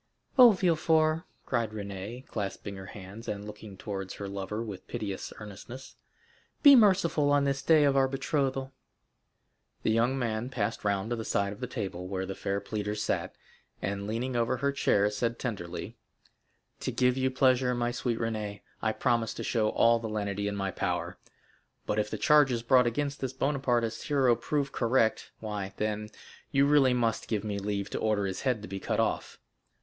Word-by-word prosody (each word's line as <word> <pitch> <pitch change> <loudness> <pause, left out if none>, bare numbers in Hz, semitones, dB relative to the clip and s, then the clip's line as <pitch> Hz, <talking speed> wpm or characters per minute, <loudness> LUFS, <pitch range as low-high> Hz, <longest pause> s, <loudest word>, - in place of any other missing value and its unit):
"Oh, 250 -3 +10
Villefort!" 160 -4 +2 0.2
cried 115 -4 0
Renée, 105 +4 -6
clasping 100 -1 -5
her 95 0 -9
hands, 100 +2 -10
and 105 0 -4
looking 105 -1 -10
towards 95 -2 -5
her 100 - -6
lover 100 +3 -4
with 100 -5 -8
piteous 100 -3 -4
earnestness, 110 +5 -10 0.7
"be 285 -2 +10
merciful 185 - +4
on 145 0 +4
this 140 -1 0
the - - -1
day 155 -2 +7
of 140 -1 +3
our 135 -1 +4
betrothal." 135 0 -1 1.1
The - - +2
young 120 +4 +2
man 115 -1 -2
passed 110 -6 -2
round 100 +2 0
to - - +1
the 110 - -4
side 100 -2 0
of 105 - -13
the - - -3
table 90 -2 -4
where 95 0 -3
the 95 - -4
fair 100 +1 -2
pleader 105 +1 -3
sat, 105 - -2 0.4
and 100 +1 -3
leaning 120 +4 -2
over 120 +2 +1
her 140 +3 +1
chair 105 -7 +2
said 115 +3 -1
tenderly: 90 -8 -5 0.8
"To - - -2
give 125 0 +2
you 130 0 +1
pleasure, 130 -1 +3
my 120 0 0
sweet 120 -1 -2
Renée, 105 -3 -3 0.2
I 110 0 +1
promise 115 -1 0
to - - -5
show 110 -3 +1
all 115 +1 +4
the 115 -1 -5
lenity 100 -1 -2
in 100 - -2
my 95 -1 -2
power; - - -2 0.7
but 105 - 0
if 105 0 0
the - - -3
charges 135 -6 +4
brought 125 0 +5
against 140 +4 -2
this 130 -1 -3
Bonapartist 130 -4 0
hero 135 -5 +4
prove 140 +2 -1
correct, 115 -2 +1
why, 105 -3 -4
then, 105 0 -2 0.4
you 140 -1 +4
really 140 -3 +5
must 115 -2 0
give 110 -3 -1
me 105 -2 -2
leave 100 0 -3
to - - -2
order 105 -2 +1
his 95 -1 -3
head 125 -6 0
to - - -6
be 95 0 -5
cut - - -1
off." - - -1
115 Hz, 185 wpm, -29 LUFS, 100-130 Hz, 1.1 s, Oh